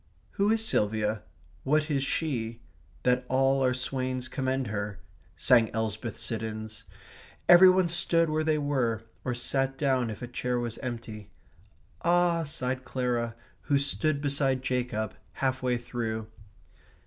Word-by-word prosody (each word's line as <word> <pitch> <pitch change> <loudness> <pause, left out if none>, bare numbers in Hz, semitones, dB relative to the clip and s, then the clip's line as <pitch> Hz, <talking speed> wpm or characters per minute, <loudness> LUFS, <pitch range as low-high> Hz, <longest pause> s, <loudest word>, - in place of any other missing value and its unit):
/* - - -36
"Who 200 +1 +1
is 225 0 +2
Silvia? 105 - 0 0.4
what 150 +3 +1
is 140 -2 +1
she? 120 -6 -2 0.4
That 125 0 +3
all 135 +1 +3
our 130 -1 +2
swains 130 0 -2
commend 130 0 -1
her?" 105 -2 -3 0.2
*/ 95 +2 -32
sang 120 -4 +6
Elsbeth 110 0 -3
Siddons. 110 -1 -4 0.6
Every 180 +1 +9
one 185 -1 +4
stood 170 0 +2
where 155 0 0
they 155 -1 +2
were, 130 -7 0 0.2
or 125 - -2
sat 135 +2 -1
down 130 -4 +1
if 110 +2 -7
a - - -4
chair 125 0 -2
was 120 -1 -4
empty. 115 -6 -6 0.7
"Ah," 175 0 +3
sighed 130 -2 -2
Clara, 120 -3 -1 0.3
who 140 - +5
stood 140 +1 0
beside 135 -2 +1
Jacob, 125 -5 -1 0.2
half 130 -1 -1
way 125 -1 +1
through. 115 -2 -4
130 Hz, 145 wpm, -28 LUFS, 115-140 Hz, 0.7 s, Every